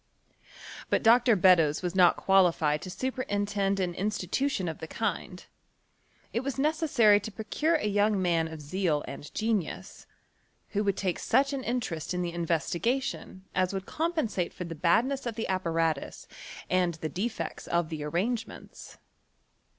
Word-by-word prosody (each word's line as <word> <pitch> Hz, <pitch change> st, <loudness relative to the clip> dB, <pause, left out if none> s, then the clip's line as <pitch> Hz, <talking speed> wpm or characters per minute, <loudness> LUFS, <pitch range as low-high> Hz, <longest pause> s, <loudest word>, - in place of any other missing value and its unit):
But -, -, +1 dB
Dr. 235 Hz, 0 st, +6 dB
Beddoes 175 Hz, -5 st, +4 dB
was 180 Hz, -1 st, -2 dB
not 180 Hz, -2 st, +5 dB
qualilied 170 Hz, -6 st, +3 dB
to -, -, -7 dB
superintend 205 Hz, -4 st, -1 dB
an 180 Hz, -2 st, -1 dB
institution 200 Hz, +3 st, -1 dB
of 160 Hz, -, -5 dB
the 160 Hz, -, -6 dB
kind: 195 Hz, -3 st, -4 dB, 0.9 s
it -, -, +1 dB
was 270 Hz, +1 st, -4 dB
necessary 280 Hz, -8 st, +4 dB
to 220 Hz, -, -7 dB
pro 220 Hz, +1 st, -8 dB
cure 315 Hz, +8 st, +1 dB
a 305 Hz, -, -1 dB
young 205 Hz, 0 st, +2 dB
man 170 Hz, -3 st, +1 dB
of 160 Hz, -1 st, -8 dB
zeal 160 Hz, -1 st, 0 dB
and 140 Hz, +1 st, -8 dB
genius, 215 Hz, -6 st, -2 dB, 0.6 s
who 205 Hz, -1 st, -1 dB
would 200 Hz, -1 st, +1 dB
take 185 Hz, -3 st, -1 dB
such 275 Hz, +1 st, +2 dB
an 270 Hz, -2 st, -3 dB
interest 185 Hz, -10 st, -3 dB
in 180 Hz, -, -1 dB
the 170 Hz, -1 st, -3 dB
investigation 185 Hz, -, -2 dB
as 185 Hz, +1 st, 0 dB
would 190 Hz, 0 st, -4 dB
compensate 315 Hz, -, -2 dB
for -, -, -5 dB
the 170 Hz, -1 st, -6 dB
badness 235 Hz, -, +1 dB
of 230 Hz, -, -3 dB
the 225 Hz, -, -3 dB
apparatus 165 Hz, -5 st, -1 dB, 0.4 s
and 180 Hz, -2 st, +1 dB
the 160 Hz, 0 st, -4 dB
defects 220 Hz, +7 st, -4 dB
of 170 Hz, -2 st, 0 dB
tlie 150 Hz, -2 st, -5 dB
arrangements. 225 Hz, +6 st, -4 dB
190 Hz, 150 wpm, -28 LUFS, 170-230 Hz, 0.9 s, Dr